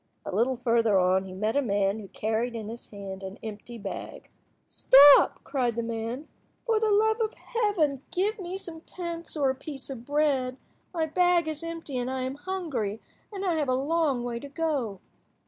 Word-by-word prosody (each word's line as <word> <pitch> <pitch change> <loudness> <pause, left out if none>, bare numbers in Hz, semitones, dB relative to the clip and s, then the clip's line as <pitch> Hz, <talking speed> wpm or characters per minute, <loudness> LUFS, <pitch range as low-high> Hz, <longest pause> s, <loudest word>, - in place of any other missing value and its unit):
A - - -4
little 245 +4 +2
further 230 -4 +3
on 185 +1 +3
he 185 - -8
met 215 +5 -1
a 285 - +4
man 200 -3 +1
who 205 - -9
carried 225 +5 -2
in 220 -2 -5
his 235 +1 -9
hand 195 -2 -8
an 190 +2 -7
empty 220 +2 -7
bag. 200 -3 -7 0.4
"Stop," 280 +2 +7
cried 245 -5 -1
the 235 - -1
man. 230 +5 -4 0.4
"For 450 -2 +2
the 440 0 +1
love 440 +2 +3
of 440 0 -1
Heaven 405 - 0
give 415 +4 0
me 370 0 -4
some 330 -4 -7
pence 340 -2 -5
or 275 -3 +3
a - - -2
piece 275 0 -7
of 240 -4 -7
bread! 275 -3 +1 0.3
My 330 -3 0
bag 350 +1 +3
is 310 0 -2
empty, 330 -6 -4
and 245 +1 -2
I 260 0 -2
am 260 +1 -2
hungry 290 - -3 0.3
and 395 -2 -5
have 315 -6 +1
a 255 - +3
long 285 -2 +1
way 240 -1 -3
to 285 - -9
go." 275 - -2
265 Hz, 190 wpm, -27 LUFS, 230-330 Hz, 0.4 s, Stop